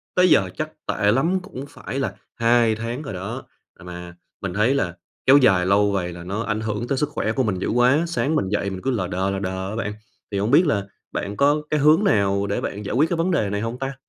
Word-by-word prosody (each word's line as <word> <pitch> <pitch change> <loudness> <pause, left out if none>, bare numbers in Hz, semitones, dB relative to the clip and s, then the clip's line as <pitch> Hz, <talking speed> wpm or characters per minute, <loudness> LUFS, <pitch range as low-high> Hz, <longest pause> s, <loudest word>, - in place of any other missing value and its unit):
tới 180 0 +5
giờ 95 - +4
chắc - - -3 0.2
tệ 105 - +2
lắm 165 - +2
cũng 140 -8 -8
phải 135 -2 -6
là 140 - -2 0.2
2 115 -1 +3
tháng 115 +4 -4
rồi 140 - -6
đó. 100 +8 -5 0.3
À, - - -17
mà 90 0 -9 0.3
mình 95 -3 -3
thấy 105 +7 +2
là 90 -11 -1 0.3
kéo 135 +2 +8
dài 95 -10 +4
lâu 100 +2 +3
vậy 90 -3 -2
là 85 0 -9
nó 100 +6 -3
ảnh 110 -1 -2
hưởng 110 +2 -3
tới 135 - 0
sức 150 +2 0
khỏe 110 -7 -1
của 130 +4 0
mình 105 -6 -1
dữ - - -2
quá, 125 +6 +3
sáng 150 -1 0
mình 95 -11 0
dậy 100 0 -1
mình 95 -1 -6
cứ 135 - 0
lờ 100 -8 -1
đờ, 95 +2 -1
lờ 95 - -2
đờ 95 0 -3
á 105 - -5
bạn. 105 -2 -3 0.4
Thì 100 - -1
hổng 105 +4 0
biết 165 +6 +6
là 100 -9 0 0.3
bạn 100 +1 -4
có 145 +2 +3
cái 150 - +1
hướng 155 +7 +5
nào 100 - +2
để 100 - -1
bạn 100 +1 -5
giải - - -3
quyết 155 +5 +3
cái 175 - -1
vấn 170 +3 +1
đề 110 - +1
này 105 +1 -2
hông 115 +3 -4
ta? 135 0 -3
110 Hz, 265 wpm, -22 LUFS, 100-135 Hz, 0.4 s, kéo